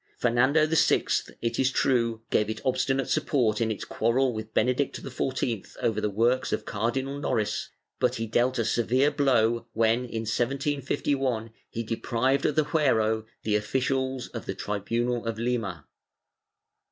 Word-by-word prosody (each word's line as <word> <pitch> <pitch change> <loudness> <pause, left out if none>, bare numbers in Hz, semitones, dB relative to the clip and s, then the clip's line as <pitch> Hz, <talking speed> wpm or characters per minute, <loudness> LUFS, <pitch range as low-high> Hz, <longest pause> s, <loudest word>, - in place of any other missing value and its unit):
Fernando 130 +6 +3
VI, 160 0 +3 0.4
it 115 0 -1
is 130 - +4
true, 115 -4 +1
gave 105 0 +2
it 110 -1 -3
obstinate 135 0 +1
support 125 -8 +1
in 115 - +1
its 110 - -4
quarrel 125 +3 +1
with 110 0 -6
Benedict 125 +4 +1
XIV 130 -4 -3
over 110 -2 0
the 105 - 0
works 115 +5 +1
of 110 - -2
Cardinal 130 +6 -2
Noris, 110 -7 -1 0.3
but - - +2
he 115 - -2
dealt 120 +4 +1
a 115 - +1
severe 125 +6 +2
blow 120 -4 +2
when, 115 +1 +3
in 120 -3 -4
1751, 130 -1 -1 0.2
he 115 - -4
deprived 120 +4 0
of 150 - -1
the 155 - +3
fuero 110 -8 +2 0.2
the 105 - 0
oflicials 130 +4 -1
of 115 - -6
the 95 - -3
tribunal 115 +5 -1
of 115 -1 -2
Lima. 110 -10 -2
120 Hz, 150 wpm, -27 LUFS, 110-130 Hz, 0.4 s, is